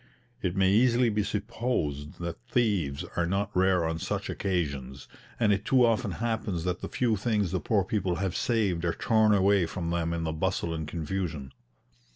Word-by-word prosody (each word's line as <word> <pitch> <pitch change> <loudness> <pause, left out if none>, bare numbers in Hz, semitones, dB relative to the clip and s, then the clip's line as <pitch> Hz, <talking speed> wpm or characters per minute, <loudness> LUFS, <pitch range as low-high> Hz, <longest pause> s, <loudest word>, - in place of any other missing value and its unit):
It 90 -1 -1
may 95 -1 +3
easily 120 +2 +4
be 105 -1 +1
supposed 100 - -2
that 85 -1 -5
thieves 95 - 0
are 85 -1 +1
not 100 +3 -1
rare 90 -2 +3
on 80 0 -2
such - - -3
occasions, 70 -8 -3 0.3
and 110 -3 +4
it 100 +1 -1
too 125 +1 +4
often 115 -3 +1
happens 110 -4 -2
that 90 0 -2
the - - -5
few 120 -3 +1
things 105 -3 0
the 95 - 0
poor 100 +5 +1
people 95 -2 -1
have 95 0 -2
saved 100 -7 0
are 85 -1 0
torn 110 -2 +3
away 100 -3 +4
from 85 0 -4
them 85 -1 0
in 85 -1 -2
the 80 -1 -2
bustle 85 0 -1
and 80 -2 -4
confusion. 80 -3 -4
95 Hz, 185 wpm, -28 LUFS, 85-105 Hz, 0.3 s, easily